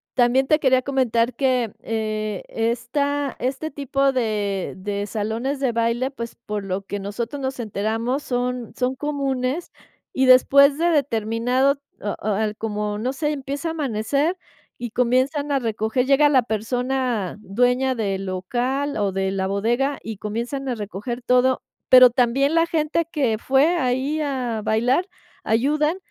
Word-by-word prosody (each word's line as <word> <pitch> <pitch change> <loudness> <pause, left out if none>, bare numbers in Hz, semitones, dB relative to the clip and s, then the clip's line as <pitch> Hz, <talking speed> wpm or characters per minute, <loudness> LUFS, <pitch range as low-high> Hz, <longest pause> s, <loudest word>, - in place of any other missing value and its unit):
también 250 +2 +3
te 305 +3 +3
quería 260 -3 +3
comentar 250 -3 +1
que, 255 -5 +1
eh, 215 -2 -3
esta 255 +5 -1
este 265 +5 -2
tipo 275 -1 0
de 210 -7 -1
de 200 +1 -3
salones 225 +7 -2
de 260 -3 +1
baile, 235 +3 0
pues, 235 -3 -7
por 210 -1 -3
lo 195 0 -3
que 205 0 -4
nosotros 230 +7 -4
nos 265 -1 -3
enteramos, 225 +5 -2
son 245 -2 -3
son 255 0 0
comunes, 275 +1 -2 0.4
y 265 0 +2
después 280 +2 +6
de 340 +2 +2
determinado 255 -1 +1 0.2
o 205 - -2
o - - -5
al 215 0 0
como 210 -1 -3
no 250 +4 -1
sé, 295 +2 -1
empieza 280 +3 -4
a - - -2
amanecer 285 - -1 0.4
y 240 -2 -5
comienzan 260 +5 +1
a 280 - +3
recoger, 225 +1 -1
llega 280 +2 +5
la 260 -4 +4
persona 245 -1 -1
dueña 250 +5 +1
del 195 -4 -2
local 250 +10 -2
o 200 -2 0
de 190 0 -1
la 190 -1 -1
bodega 240 +8 0
y 225 -2 -6
comienzan 235 +7 -4
a 245 - -1
recoger 220 +3 -5
todo, 250 +1 +3 0.3
pero 255 -1 +9
también 260 +4 +2
la 330 0 +3
gente 325 0 0
que 250 -8 0
fue 275 +8 +3
ahí 270 +2 0
a 250 -6 -2
bailar, 245 - +1 0.4
ayudan, 300 +9 +1
250 Hz, 150 wpm, -22 LUFS, 220-275 Hz, 0.4 s, pero